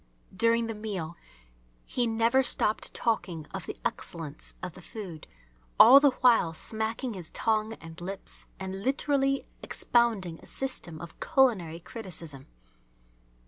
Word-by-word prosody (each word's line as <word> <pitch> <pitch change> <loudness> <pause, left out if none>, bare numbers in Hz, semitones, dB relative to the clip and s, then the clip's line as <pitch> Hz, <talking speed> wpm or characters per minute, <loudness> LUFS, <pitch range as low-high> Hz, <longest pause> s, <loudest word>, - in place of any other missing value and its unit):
During 230 +3 +3
the 225 - -3
meal 195 -6 -5 0.7
he 245 -2 0
never 230 +3 +3
stopped 220 -4 0
talking 180 -9 -1
of - - -5
the - - -5
excellence 155 -3 -3
of 180 -2 -4
the 185 - -12
food, 180 -5 -8 0.5
all 270 +3 +11
the 285 0 +6
while 230 -10 +5
smacking 220 - -3
his 180 -5 -7
tongue 220 0 +1
and 165 -3 -11
lips, 195 +2 -5
and 190 0 -5
literally 275 +2 +1 0.2
expounding 215 -9 +1
a - - -15
system 215 -12 -2
of 170 -1 -10
culinary 215 - +2
criticism. 165 - -8
215 Hz, 130 wpm, -29 LUFS, 170-235 Hz, 0.7 s, all